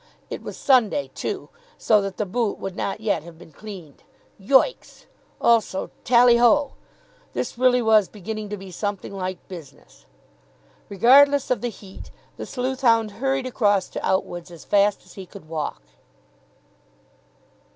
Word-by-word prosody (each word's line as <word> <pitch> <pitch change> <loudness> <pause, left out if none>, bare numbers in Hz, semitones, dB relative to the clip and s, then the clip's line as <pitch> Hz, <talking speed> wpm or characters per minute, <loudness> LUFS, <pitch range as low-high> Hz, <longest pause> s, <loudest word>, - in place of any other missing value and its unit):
It - - -5
was - - -8
Sunday, 265 +1 +2
too, - - -5 0.3
so 215 -2 +3
that 195 -1 -5
the 210 - -1
boot 220 +2 -1
would 195 -1 -6
not 200 +2 -3
yet 220 -2 0
have 165 +1 -13
been 170 -1 -15
cleaned. 185 -7 -11 0.4
Yoicks! 265 - +1 0.3
Also 225 -5 +1
Tally 240 0 +5
ho! 275 +4 +3 0.6
This - - -3
really 250 0 +3
was 215 -3 +4
beginning 215 +1 -6
to 210 - -4
be 190 -1 -11
something 205 +1 -4
like 185 -1 -5
business. 165 -7 -13 0.8
Regardless 275 +8 +5
of 250 - +1
the 240 - -2
heat, 195 -3 -12 0.3
the - - -7
sleuth 260 +1 -3
hound 230 -4 +3
hurried 265 +4 -2
across 205 -6 +1
to - - -6
Outwood's 175 -2 -2
as 170 -3 -13
fast 205 0 +2
as - - -16
he 190 -2 -10
could 190 -3 -13
walk. 155 - -4
210 Hz, 150 wpm, -23 LUFS, 190-245 Hz, 0.8 s, Tally